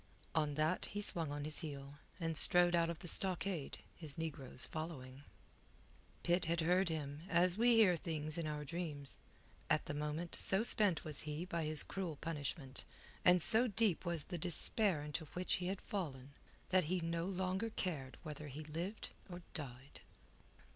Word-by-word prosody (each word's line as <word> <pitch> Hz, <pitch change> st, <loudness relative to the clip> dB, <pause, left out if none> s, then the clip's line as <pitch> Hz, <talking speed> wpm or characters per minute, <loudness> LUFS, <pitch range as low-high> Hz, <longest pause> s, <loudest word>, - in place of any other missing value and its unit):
On 150 Hz, -2 st, 0 dB
that 155 Hz, +4 st, 0 dB
he 205 Hz, -, -5 dB
swung 170 Hz, -7 st, +2 dB
on 145 Hz, 0 st, -4 dB
his 155 Hz, 0 st, -2 dB
heel, 145 Hz, -3 st, -7 dB, 0.2 s
and 165 Hz, -2 st, -2 dB
strode 175 Hz, +2 st, +7 dB
out 170 Hz, -1 st, +2 dB
of 170 Hz, -, -4 dB
the 175 Hz, -, -10 dB
stockade, 185 Hz, -3 st, +1 dB, 0.2 s
his 155 Hz, -2 st, 0 dB
negroes 140 Hz, -6 st, 0 dB
following. 140 Hz, -5 st, -7 dB, 1.0 s
Pitt 175 Hz, +1 st, +1 dB
had 170 Hz, +1 st, 0 dB
heard 180 Hz, +3 st, +2 dB
him, 150 Hz, -2 st, -4 dB
as 175 Hz, +1 st, +3 dB
we 235 Hz, +2 st, +4 dB
hear 205 Hz, -6 st, +5 dB
things 155 Hz, -2 st, -3 dB
in 165 Hz, -2 st, -2 dB
our 150 Hz, -1 st, -4 dB
dreams. 150 Hz, -3 st, -5 dB, 0.5 s
At 155 Hz, -, +2 dB
the -, -, -4 dB
moment 150 Hz, +3 st, -4 dB
so 195 Hz, +3 st, +5 dB
spent 205 Hz, -7 st, +3 dB
was 155 Hz, -2 st, -4 dB
he 150 Hz, +4 st, -4 dB
by 170 Hz, -3 st, -3 dB
his 155 Hz, -1 st, +4 dB
cruel 185 Hz, -5 st, -4 dB
punishment, 145 Hz, -2 st, -5 dB, 0.4 s
and 180 Hz, -2 st, +5 dB
so 235 Hz, +3 st, +8 dB
deep 210 Hz, -4 st, +1 dB
was 170 Hz, -4 st, -2 dB
the 175 Hz, +1 st, -6 dB
despair 180 Hz, 0 st, +1 dB
into 150 Hz, +2 st, -4 dB
which 180 Hz, +1 st, 0 dB
he 180 Hz, -, -2 dB
had 190 Hz, +1 st, -3 dB
fallen, 140 Hz, -9 st, -5 dB, 0.4 s
that 185 Hz, -2 st, +3 dB
he 180 Hz, +4 st, -1 dB
no 165 Hz, 0 st, -2 dB
longer 190 Hz, +3 st, -2 dB
cared 155 Hz, -11 st, -4 dB
whether 150 Hz, -2 st, -7 dB
he 145 Hz, +3 st, -7 dB
lived 170 Hz, +8 st, -5 dB, 0.2 s
or 175 Hz, 0 st, -8 dB
died. 135 Hz, -2 st, -5 dB
165 Hz, 170 wpm, -37 LUFS, 150-180 Hz, 1.0 s, so